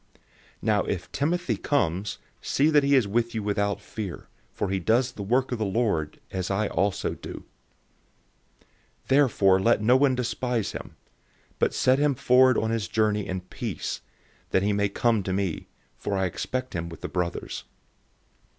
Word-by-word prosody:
016:010 - - -27 0.4
Now - - +2
if - - -4
Timothy 175 +5 0
comes, 95 - 0 0.2
see 150 +3 +2
that 150 -1 +6
he 140 0 +4
is 125 -6 +4
with 115 +3 0
you 110 - -2
without 100 0 0
fear, 100 -6 -6 0.3
for - - -2
he 95 - 0
does 120 +8 +2
the - - -9
work 125 +7 +1
of 125 - -2
the - - +1
Lord, 95 -8 0
as 95 -2 -3
I 100 +2 +1
also 100 +2 0
do. - - -8 1.6
016:011 - - -33
Therefore 115 -9 +4
let 115 +1 +3
no 120 +4 +5
one 130 -1 +4
despise 125 -3 -1
him. - - -8 0.6
But - - +1
set 130 +1 +3
him 145 -2 +2
forward 130 -1 +5
on 110 0 0
his 115 -5 -1
journey 105 0 +1
in 90 0 -3
peace, 90 - -5 0.5
that 95 - +2
he 105 +1 +2
may 100 0 +1
come 115 +1 +2
to 95 0 -3
me; 95 -4 -2 0.3
for 100 - -2
I 95 - +1
expect 130 +8 -3
him 85 -2 -3
with 85 - -10
the - - -3
brothers. 90 -2 -3
110 Hz, 175 wpm, -26 LUFS, 95-130 Hz, 1.6 s, that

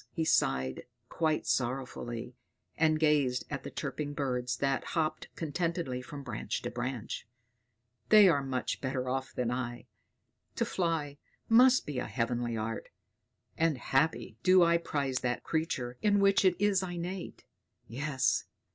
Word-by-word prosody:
he 165 -2 -2
sighed 65 - +1 0.2
quite 155 -2 0
sorrowful, 125 -1 -1 0.7
and 155 -1 +3
gazed 145 -5 +2
at 140 -2 -3
the - - -7
chirping 145 -1 -4
birds 125 -3 -1
that 135 -1 0
hopped 155 -1 0
contentedly 165 -4 -2
from 140 +3 -8
branch 110 -3 -4
to - - -3
branch, 120 -2 -4 0.8
"they 210 -2 +9
are 155 -6 +4
much 130 -2 -2
better 130 -1 -2
off 130 +1 -2
than 125 -1 -1
I! 120 -1 -4 0.7
To - - +1
fly 160 -5 -1 0.3
must 250 +3 +6
be 145 -4 -3
a - - -3
heavenly 120 -1 -1
art; 110 0 -4 0.7
and 160 -3 +2
happy 135 -4 0
do 185 +3 +6
I 170 0 +4
prize 140 -5 -1
that 120 -1 -2
creature 130 -7 -2
in 205 -1 +3
which 200 0 +4
it 185 -1 +3
is 205 -2 +3
innate. 180 0 -5 0.4
Yes! 135 +2 0
140 Hz, 140 wpm, -31 LUFS, 125-165 Hz, 0.8 s, they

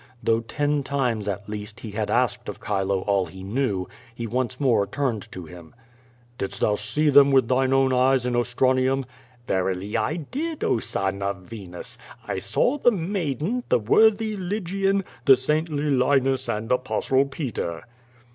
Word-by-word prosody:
Though 115 0 +3
ten 145 +5 -1
times, 125 -7 -1
at 100 0 -3
least, 105 0 -7
he 110 - -7
had 105 0 -2
asked - - 0
of - - -7
Chilo 95 -1 -1
all 100 -2 +1
he 95 +3 -10
knew, 100 -3 -1 0.3
he 115 - -4
once 125 +2 -2
more 120 -8 +2
turned 115 -6 -2
to 90 -2 -7
him. 85 +1 -13 0.6
"Didst 100 +1 -3
thou 105 - +3
see 110 +9 +1
them 140 0 +7
with 130 -3 +4
thine 130 +1 +2
own 135 -1 +3
eyes 130 0 +3
in 125 -1 0
Ostranium? 130 +2 +1 0.4
"Verily 95 +1 -1
I 115 +7 0
did, 290 - -4
oh, - - +2
son 95 -2 -2
of 100 -1 -3
Venus! 90 -3 -9 0.3
I 95 - -2
saw 110 - +1
the 245 - +5
maiden, 185 - -2
the - - +5
worthy 215 - +3
Lygian, 195 0 -1 0.2
the 135 -2 +8
saintly 150 +1 0
Linus 135 0 +2
and 110 +2 -2
Apostle 130 +1 +1
Peter.' 120 - -4
125 Hz, 160 wpm, -24 LUFS, 105-145 Hz, 0.6 s, the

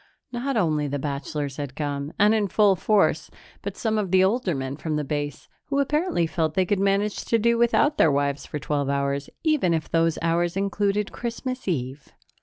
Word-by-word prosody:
Not 250 +1 -2
only 155 -6 +1
the 145 +1 -2
bachelors 140 0 -4
had 140 -3 -5
come 145 -1 -3
and 210 +1 +5
in 215 -2 +1
full 200 +1 +4
force 205 +3 +2 0.3
but - - -6
some 220 -2 0
of 200 -3 -2
the 185 +1 +4
older 195 -3 +1
men 135 0 -4
from 155 +1 -3
Base, 145 0 -3 0.2
who 280 - -2
apparently 295 - +1
felt 160 -1 -1
they 185 - +3
could 200 +2 0
manage 200 +1 +1
to 230 - +2
do 235 +1 +2
without 235 +5 +2
their 160 - +5
wives 140 0 0
for - - -4
twelve 145 -1 -1
hours, 140 0 -1
even 300 - +2
if 155 -1 -3
those 165 -1 +2
hours 170 +2 +1
included 200 +1 0
Christmas 255 +1 -5
Eve. 135 -4 -3
175 Hz, 190 wpm, -24 LUFS, 145-215 Hz, 0.3 s, and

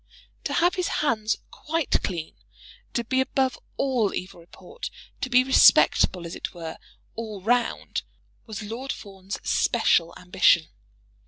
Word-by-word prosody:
To - - -1
have 350 +2 +3
his 365 -2 -1 0.2
hands 220 -5 +1
quite 325 0 -1
clean, 165 -4 -4 0.6
to 235 - +1
be 260 +3 +1
above 265 -1 0 0.2
all 250 -7 +1
evil 185 -1 -6
report, 450 - -9 0.3
to 255 - -2
be 250 0 +5
respectable, 190 -8 +5
as 170 - -6
it - - -6
were, 165 -2 -7 0.3
all 220 -3 -6
round, 240 +4 0 0.5
was 220 -1 -6
Lord 235 +6 -5
Fawn's 195 -2 -7
special 170 0 +2
ambition. 180 -2 +3
220 Hz, 135 wpm, -25 LUFS, 185-260 Hz, 0.6 s, be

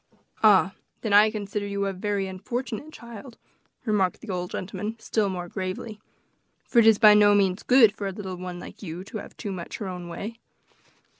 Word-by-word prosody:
"Ah! 195 -3 +5 0.3
then 215 -3 -1
I 210 +1 +7
consider 205 -1 -4
you 200 0 -2
a 195 - -1
very 200 +1 -2
unfortunate 235 +8 -5
child," 235 -2 -11 0.5
remarked 200 -5 +1
the 230 - -6
old 180 -1 -3
gentleman, 200 +4 -4
still 215 -2 0
more 180 -2 -4
gravely; 190 +4 -5 0.7
"for 240 - +3
it 225 - +6
is 220 -2 +7
by 215 -1 +8
no 205 0 +6
means 195 -1 +2
good 235 -5 +5
for 200 - -4
a - - -2
little 190 -1 -6
one 180 0 -6
like - - -11
you 175 -2 -6
to 215 +2 -7
have - - -11
too 205 - -5
much 180 -3 -6
of - - -8
her 205 - -3
own 180 -1 -6
way." 215 +7 -6
205 Hz, 200 wpm, -26 LUFS, 185-220 Hz, 0.7 s, by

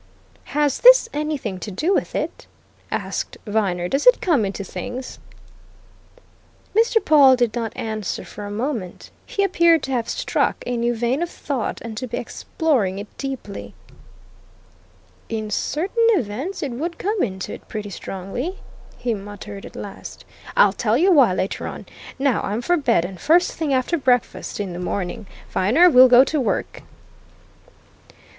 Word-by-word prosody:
"Has 295 -2 +2
this - - +8
anything 290 -11 -3
to 210 - -6
do 305 - 0
with - - -1
it?" - - -4 0.4
asked - - -3
Viner. 195 -5 0
"Does 275 - 0
it - - +7
come 295 - +2
into 195 +1 -4
things?" 250 +8 -7 1.6
Mr. 450 +1 +4
Pawle 280 -4 +7
did 240 -3 +1
not 230 -2 -3
answer 215 -3 -4
for 205 -1 -8
a - - -6
moment; 220 -4 -4 0.2
he 400 - 0
appeared 340 -5 +4
to 270 - -4
have 240 -2 -1
struck - - -1
a 245 - -2
new 235 0 0
vein 240 +6 0
of 345 - -1
thought 270 -8 -3
and 230 -1 -7
to 255 - -4
be - - -4
exploring 240 - -1
it 205 +1 -9
deeply. 265 -7 -6 1.5
"In 215 -2 -4
certain 390 - 0
events, 255 - -4
it 280 - -3
would 330 +8 -4
come 415 0 -1
into 190 -4 -3
it - - -11
pretty 210 -2 -6
strongly!" 195 - -5 0.4
he 245 -2 -1
muttered 205 0 -8
at - - -15
last. 200 - -9 0.3
"I'll 200 -1 +6
tell 220 +2 +1
you 370 +7 +4
why, 275 - +6
later 190 - -2
on. - - -7 0.3
Now 275 -4 +1
I'm 215 +4 -3
for 350 - +2
bed 235 - +2
and 185 0 -8
first 345 +3 +4
thing 315 -3 -2
after 265 +6 +1
breakfast, 250 -5 0
in 195 -3 -3
the 175 - -6
morning, 185 +2 -4 0.2
Viner, 265 - +4
we'll 255 -1 +8
go 250 +1 +8
to 290 +1 -1
work." 245 - -2
245 Hz, 160 wpm, -22 LUFS, 205-300 Hz, 1.6 s, this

